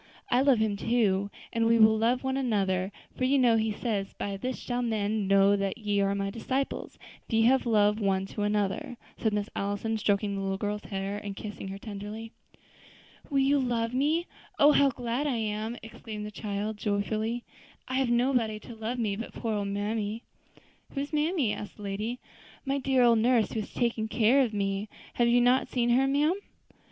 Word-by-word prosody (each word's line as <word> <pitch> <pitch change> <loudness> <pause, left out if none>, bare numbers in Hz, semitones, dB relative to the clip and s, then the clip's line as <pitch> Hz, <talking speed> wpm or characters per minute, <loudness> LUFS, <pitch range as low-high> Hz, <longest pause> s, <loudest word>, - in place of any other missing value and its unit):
I 245 - +4
love 275 -2 +5
Him 215 -2 0
too, 200 -3 +1 0.2
and 230 0 +2
we 230 0 +5
will 220 -1 +6
love 235 +4 +1
one 265 0 -1
another; 195 -7 0 0.2
for - - -3
you 270 +2 +3
know 245 -3 +5
He 220 0 +1
says, 205 -2 -2
'By 200 -1 -4
this 250 +6 -3
shall 245 0 -3
men 215 -3 0
know 195 +1 +5
that 195 +1 -1
ye 205 -3 0
are 200 0 +1
my 195 0 -2
disciples, 260 +5 -3 0.3
if - - -14
ye 225 0 +4
have 255 +2 +4
love 210 -1 +3
one 195 -2 +1
to 205 - -6
another,'" 205 +3 -1 0.2
said 220 - +1
Miss 205 0 -1
Allison, 205 +3 -2
stroking 205 0 +1
the 195 - -3
little 195 0 -1
girl's 210 +1 -3
hair, 195 0 -3
and 200 -1 -6
kissing 205 -1 -7
her 195 +1 -6
tenderly. 210 +2 -7 1.0
"Will 280 - 0
you 280 +1 +3
love 235 -2 -1
me? 300 +6 +1 0.3
Oh! 290 +1 +7
how 280 -1 +5
glad 245 +3 -2
I 270 - 0
am," 220 +1 -2
exclaimed 220 -1 -7
the 210 - -6
child 210 0 -3
joyfully; 215 +3 -1 0.4
"I 260 - -5
have 265 -2 +1
nobody 240 -3 +1
to 235 - -10
love 225 +2 -4
me 215 -4 0
but 230 +3 -6
poor 225 -2 -3
old 205 -1 -1
mammy." 210 +2 -2 0.7
"And - - -19
who 275 - 0
is 285 +2 -6
mammy?" 300 - +1
asked 210 - -7
the 210 - -10
lady. 210 +5 -3 0.5
"My 275 +1 0
dear 265 -1 +3
old 235 -2 +5
nurse, 235 -1 +3
who 225 - -2
has 210 - -5
always 240 -1 +3
taken 220 -1 -3
care 235 +4 +4
of 245 -4 +1
me. 200 0 -2 0.2
Have 240 - +2
you 240 +1 +4
not 250 +2 +3
seen 240 -1 0
her, 265 +3 +4
ma'am?" 290 +4 +3
220 Hz, 205 wpm, -28 LUFS, 205-245 Hz, 1.0 s, Oh